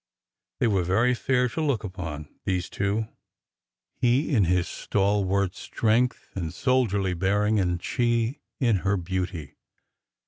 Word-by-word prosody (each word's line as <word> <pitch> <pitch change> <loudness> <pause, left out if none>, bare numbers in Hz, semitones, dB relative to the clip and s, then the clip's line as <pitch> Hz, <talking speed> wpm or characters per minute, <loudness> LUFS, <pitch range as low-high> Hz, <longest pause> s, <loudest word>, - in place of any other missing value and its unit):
They - - +2
were 100 -5 +2
very 110 +8 +3
fair 125 +1 +1
to 160 - -3
look 140 -7 0
upon— 80 -7 -6 0.2
these 90 -2 -1
two— 100 +2 -1 0.9
he 130 +5 +1
in 105 -7 +4
his 90 0 +1
stalwart 100 -1 0
strength 120 +3 0
and 85 -4 -3
soldierly 105 - +1
bearing, 105 +4 +1
and 90 -2 0
she 120 +2 0 0.2
in 115 -6 +3
her 95 +2 0
beauty. 90 -4 -4
100 Hz, 130 wpm, -26 LUFS, 90-120 Hz, 0.9 s, in